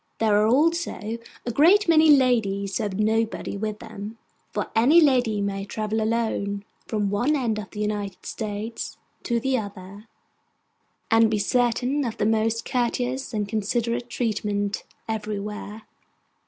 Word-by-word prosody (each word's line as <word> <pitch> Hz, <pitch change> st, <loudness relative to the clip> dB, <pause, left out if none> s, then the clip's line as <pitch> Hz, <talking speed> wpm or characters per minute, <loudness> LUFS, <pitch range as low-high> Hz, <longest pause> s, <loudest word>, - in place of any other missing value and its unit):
There 220 Hz, -2 st, +3 dB
are 215 Hz, -, +3 dB
also 270 Hz, -5 st, +1 dB, 0.3 s
a 240 Hz, -, -1 dB
great 355 Hz, -, +5 dB
many 320 Hz, -1 st, +6 dB
ladies 220 Hz, -8 st, +3 dB
who -, -, 0 dB
have 200 Hz, -1 st, -4 dB
nobody 220 Hz, 0 st, 0 dB
with 210 Hz, +1 st, -3 dB
them: 210 Hz, +2 st, -8 dB, 0.3 s
for -, -, -3 dB
any 260 Hz, +10 st, +6 dB
lady 250 Hz, -9 st, +3 dB
may 195 Hz, -1 st, -2 dB
travel 215 Hz, +2 st, -2 dB
alone, 215 Hz, -3 st, -1 dB, 0.2 s
from 205 Hz, -3 st, -1 dB
one 245 Hz, +9 st, +2 dB
end 230 Hz, -6 st, 0 dB
of 205 Hz, -, -7 dB
the 210 Hz, -, -6 dB
United 205 Hz, -3 st, -3 dB
States 215 Hz, +1 st, -5 dB, 0.2 s
to 235 Hz, -1 st, 0 dB
the 265 Hz, +1 st, +1 dB
other, 200 Hz, 0 st, -9 dB, 1.0 s
and 225 Hz, 0 st, +5 dB
be 215 Hz, -, +1 dB
certain 245 Hz, +6 st, +1 dB
of 235 Hz, -2 st, -3 dB
the 210 Hz, -, 0 dB
most 225 Hz, +1 st, +1 dB
courteous 250 Hz, +1 st, -1 dB
and 210 Hz, -3 st, -2 dB
considerate 235 Hz, +3 st, -1 dB
treatment 205 Hz, -4 st, -2 dB, 0.2 s
everywhere. 210 Hz, 0 st, -4 dB
220 Hz, 140 wpm, -25 LUFS, 205-245 Hz, 1.0 s, many